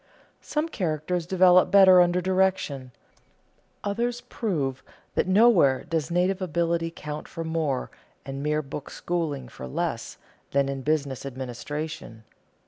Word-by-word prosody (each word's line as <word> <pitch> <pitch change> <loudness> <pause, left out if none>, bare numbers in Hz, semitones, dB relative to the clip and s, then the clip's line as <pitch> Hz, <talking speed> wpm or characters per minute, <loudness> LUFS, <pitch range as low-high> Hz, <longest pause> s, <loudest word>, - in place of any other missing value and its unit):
Some 305 +2 -2
characters 170 - -2
develop 185 -1 +5
better 190 -2 +8
under 175 +1 +2
direction; 185 -8 0 0.9
others 235 +4 -1
prove 155 - -3 0.3
that - - +1
nowhere 185 - +5
does 160 -4 -2
native 180 +3 +1
ability 170 -1 0
count 150 -2 -7
for 165 - -6
more, 160 -5 -2 0.3
and 135 0 -5
mere 150 +1 0
book 140 +1 -7
schooling 155 -7 -3
for 65 - -9
less, 65 - -3 0.3
than 140 0 +1
in 135 -1 -4
business 140 -2 -1
administration. 135 0 -6
165 Hz, 125 wpm, -26 LUFS, 140-185 Hz, 0.9 s, better